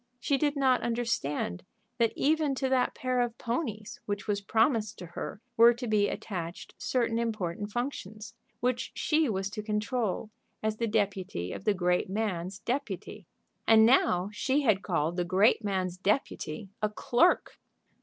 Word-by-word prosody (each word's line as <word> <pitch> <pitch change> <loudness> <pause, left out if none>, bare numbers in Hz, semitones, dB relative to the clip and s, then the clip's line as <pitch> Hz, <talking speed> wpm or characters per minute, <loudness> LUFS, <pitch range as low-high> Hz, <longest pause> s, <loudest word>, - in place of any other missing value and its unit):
She 275 +2 +1
did 290 0 +1
not 265 -3 +3
understand 230 - -1 0.4
that 230 -1 +3
even 300 -1 +2
to 265 0 0
that 260 -1 +2
pair 255 -1 0
of 240 -1 -2
ponies 230 -4 -3
which 205 -1 -3
was 205 -2 -1
promised 220 +1 +1
to 180 - -8
her 175 +4 -6 0.2
were 235 +1 +8
to 245 +1 -5
be 210 -2 +3
attached 175 -4 -5
certain 230 -2 0
important 205 -3 -2
functions, 220 -4 -4 0.3
which 250 0 0
she 310 -3 +2
was 195 -1 -2
to 215 - -4
control 215 0 -2 0.3
as 215 0 0
the 230 - 0
deputy 195 - -1
of - - -8
the 210 -2 +3
great 180 0 +1
man's 190 -3 -2
deputy 210 - -4 0.4
And 220 0 +7
now 200 -6 +3
she 270 +6 +1
had 215 -8 +3
called 170 -2 -1
the 175 - +1
great 195 +6 +3
man's 185 -3 -1
deputy 200 - -1
a 215 - +2
clerk! 245 +10 +2
215 Hz, 155 wpm, -29 LUFS, 190-240 Hz, 0.4 s, were